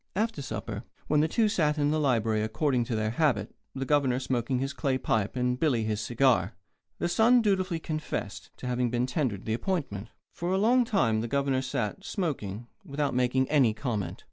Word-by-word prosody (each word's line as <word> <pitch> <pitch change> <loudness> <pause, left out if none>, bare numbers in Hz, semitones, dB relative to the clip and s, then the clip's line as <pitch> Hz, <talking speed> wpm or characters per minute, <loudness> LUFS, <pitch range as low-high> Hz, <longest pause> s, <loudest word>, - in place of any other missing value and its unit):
After 215 -6 -1
supper, 110 -3 -5 0.2
when 150 - +2
the 155 - +3
two 220 +7 +2
sat 155 -8 +1
in 145 0 +2
the 155 - +1
library, 115 -6 +1
according 120 +3 0
to 115 - -2
their 110 0 0
habit, 120 -6 +1 0.2
the 135 0 -2
Governor 135 -3 +2
smoking 130 -1 -1
his 135 +2 -2
clay 130 0 0
pipe 110 -4 0
and 125 0 0
Billy 130 -8 +2
his 110 -1 -1
cigar, 120 -1 +2 0.4
the - - -1
son 230 +7 +5
dutifully 190 -5 +1
confessed 155 -10 -4
to - - -9
having 125 -1 0
been 120 +1 0
tendered 125 -6 -2
the 110 - -1
appointment. 120 - -2 0.3
For 175 +1 -3
a - - +2
long 240 +5 +4
time 115 - +2
the 115 - -3
Governor 135 0 +1
sat, 130 -5 -3
smoking, 120 - -3 0.2
without 140 0 -2
making 125 +1 +2
any 130 -8 +4
comment. 110 -5 -3
130 Hz, 190 wpm, -28 LUFS, 115-155 Hz, 0.4 s, son